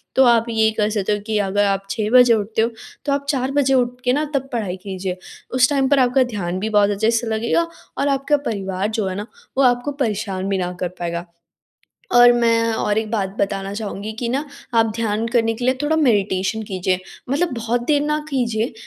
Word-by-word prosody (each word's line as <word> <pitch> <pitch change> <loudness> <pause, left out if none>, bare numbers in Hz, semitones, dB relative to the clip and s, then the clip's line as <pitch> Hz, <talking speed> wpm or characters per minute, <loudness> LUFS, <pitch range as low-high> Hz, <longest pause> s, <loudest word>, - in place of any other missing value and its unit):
तो 265 - +6
आप 235 -1 +4
ये 220 -1 +3
कर 210 0 +2
सकते 210 -1 -1
हो 205 - -1
कि 215 -1 0
अगर 205 0 +1
आप 195 0 0
6 210 +1 -1
बजे 245 -2 +7
उठते 220 +1 0
हो, 230 - +2 0.4
तो 285 - 0
आप 280 0 -2
4 265 -2 0
बजे 275 -1 +2
उठ 250 -1 +1
के 250 - +3
ना 300 +3 +1
तब 270 0 -1
पढ़ाई 200 -6 -2
कीजिए। 185 -2 -4 0.4
उस 255 +1 +5
टाइम 270 -2 +2
पर 285 -1 +4
आपका 255 +1 +4
ध्यान 185 -7 -3
भी 220 +2 -2
बहुत 205 -1 +4
अच्छे 220 +3 +1
से 230 0 0
लगेगा, 235 +10 0 0.3
और 285 - +1
आपका 275 +1 +2
परिवार 195 -1 -2
जो 215 -3 -1
है 185 - -3
ना, 205 +3 -5 0.3
वो 275 - +4
आपको 245 +2 +2
परेशान 195 -4 -2
भी 195 - +1
ना 180 -1 -2
कर 180 - -1
पाएगा। 170 0 -3 0.9
और 245 0 +8
मैं 230 -1 +2
और 210 -1 0
एक 220 -1 -3
बात 205 -4 0
बताना 195 0 -1
चाहूँगी 210 0 -5
कि 240 - -2
ना 275 +5 -1 0.3
आप 225 - +5
ध्यान 225 0 -1
करने 225 -1 +1
के 245 - -5
लिए 255 +1 +3
थोड़ा 315 +2 +1
मेडिटेशन 210 -5 +1
कीजिए, 185 -2 -1 0.3
मतलब 315 +3 +1
बहुत 230 +1 -1
देर 290 -2 +3
ना 300 +1 0
कीजिए। 235 -5 -1
225 Hz, 215 wpm, -20 LUFS, 200-250 Hz, 0.9 s, और